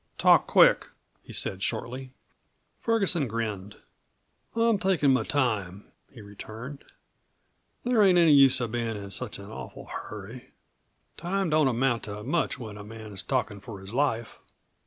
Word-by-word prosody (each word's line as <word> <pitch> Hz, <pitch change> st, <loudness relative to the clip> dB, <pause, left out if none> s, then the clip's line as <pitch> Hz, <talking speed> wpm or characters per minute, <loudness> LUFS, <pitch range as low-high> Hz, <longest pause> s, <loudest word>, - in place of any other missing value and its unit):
"Talk -, -, +5 dB
quick!" -, -, +5 dB, 0.3 s
he -, -, -13 dB
said 95 Hz, -, -2 dB
shortly. 125 Hz, +5 st, -3 dB, 0.7 s
Ferguson 195 Hz, -, +1 dB
grinned. 105 Hz, -3 st, -4 dB, 0.8 s
"I'm 230 Hz, -2 st, +3 dB
takin' 175 Hz, -8 st, +3 dB
my 130 Hz, -, +2 dB
time," 105 Hz, -9 st, -1 dB, 0.2 s
he 120 Hz, -, -12 dB
returned. 110 Hz, +7 st, -9 dB, 1.0 s
"There 245 Hz, -3 st, +3 dB
ain't 190 Hz, -3 st, +6 dB
any 165 Hz, -3 st, +6 dB
use 135 Hz, -1 st, +6 dB
of 115 Hz, -2 st, -2 dB
bein' 115 Hz, -2 st, -2 dB
in 100 Hz, -1 st, -8 dB
such 125 Hz, +1 st, -3 dB
an 100 Hz, +1 st, -10 dB
awful -, -, -9 dB
hurry 105 Hz, +4 st, -9 dB, 0.6 s
time 190 Hz, -1 st, -1 dB
don't 155 Hz, -2 st, +4 dB
amount 120 Hz, -1 st, +1 dB
to 105 Hz, 0 st, -7 dB
much 150 Hz, +7 st, 0 dB
when 110 Hz, -4 st, -8 dB
a -, -, -8 dB
man's 105 Hz, -2 st, -7 dB
talkin' 120 Hz, -6 st, -2 dB
for 100 Hz, 0 st, -9 dB
his 95 Hz, +3 st, -11 dB
life. 120 Hz, -4 st, -1 dB
120 Hz, 145 wpm, -27 LUFS, 105-145 Hz, 1.0 s, ain't